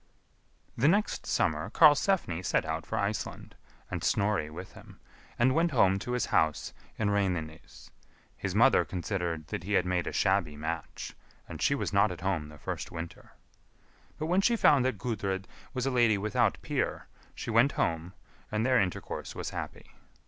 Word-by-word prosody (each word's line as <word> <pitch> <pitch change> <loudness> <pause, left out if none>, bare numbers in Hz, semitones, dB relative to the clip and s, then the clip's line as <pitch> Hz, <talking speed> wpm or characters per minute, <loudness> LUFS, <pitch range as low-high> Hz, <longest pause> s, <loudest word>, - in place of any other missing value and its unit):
The 135 - +3
next 205 +6 +1
summer - - 0
Karlsefni 150 - +4
set - - +1
out 80 +1 -3
for 110 - -2
Iceland, 105 +1 -3 0.4
and - - -3
Snorri 100 -7 +1
with 90 +4 -9
him, - - -15 0.4
and 130 +2 +3
went 165 +3 +3
home 95 - +3
to 125 - -4
his 125 - +1
house 80 -2 +1 0.2
in 105 -2 +1
Reynines. 90 -6 -3 0.4
His 95 -1 -4
mother 125 +5 +5
considered 90 -4 -3
that - - -3
he 105 +3 -3
had - - +3
made 90 -1 0
a - - -1
shabby 95 -6 +1
match, 80 +1 -5 0.3
and - - -8
she 140 - +3
was 135 - -3
not 100 0 +4
at 90 - -7
home 90 -5 -1
the 75 - -12
first - - -5
winter. 85 0 -8 0.8
But 155 - -3
when 180 +4 +2
she 235 +4 +3
found 145 - +5
that 130 -5 0
Gudrid 95 -3 -2 0.3
was 130 -1 -2
a 135 - +1
lady 120 -4 +4
without 105 +1 +1
peer, - - -2 0.3
she - - -5
went 115 +5 +4
home, 85 +2 -1 0.4
and 110 +2 0
their 130 -3 +4
intercourse 95 -2 -4
was - - -4
happy. - - -6
100 Hz, 170 wpm, -29 LUFS, 85-125 Hz, 0.8 s, mother